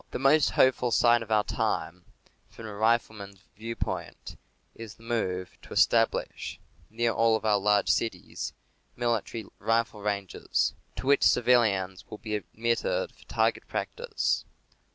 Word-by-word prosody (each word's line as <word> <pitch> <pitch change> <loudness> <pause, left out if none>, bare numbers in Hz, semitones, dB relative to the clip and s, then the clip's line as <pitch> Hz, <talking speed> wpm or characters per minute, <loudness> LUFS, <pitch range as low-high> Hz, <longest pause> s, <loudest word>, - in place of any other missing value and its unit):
The - - -4
most 140 +3 +4
hopeful 130 -1 +3
sign 120 +1 +4
of 115 - -8
our 105 -1 +4
time, 90 -3 -2 0.4
from 115 - -11
a 105 - -7
rifleman's 105 -3 -1
viewpoint, 115 +2 -5 0.4
is 115 -2 -10
the 115 - -19
move 95 -6 -2
to - - -11
establish, - - +1 0.3
near 115 +1 0
all 115 0 +3
of 110 - -4
our 105 -2 +3
large 105 0 +2
cities, 105 -6 -1 0.4
military 115 -2 -2
rifle 115 0 0
ranges, 100 -2 -1 0.2
to - - -6
which 140 +1 +4
civilians 105 -7 +3
will 105 - -7
be 110 -1 -6
admitted 115 - -1
for - - -21
target - - 0
practice. 475 -2 -2
115 Hz, 135 wpm, -28 LUFS, 105-120 Hz, 0.4 s, most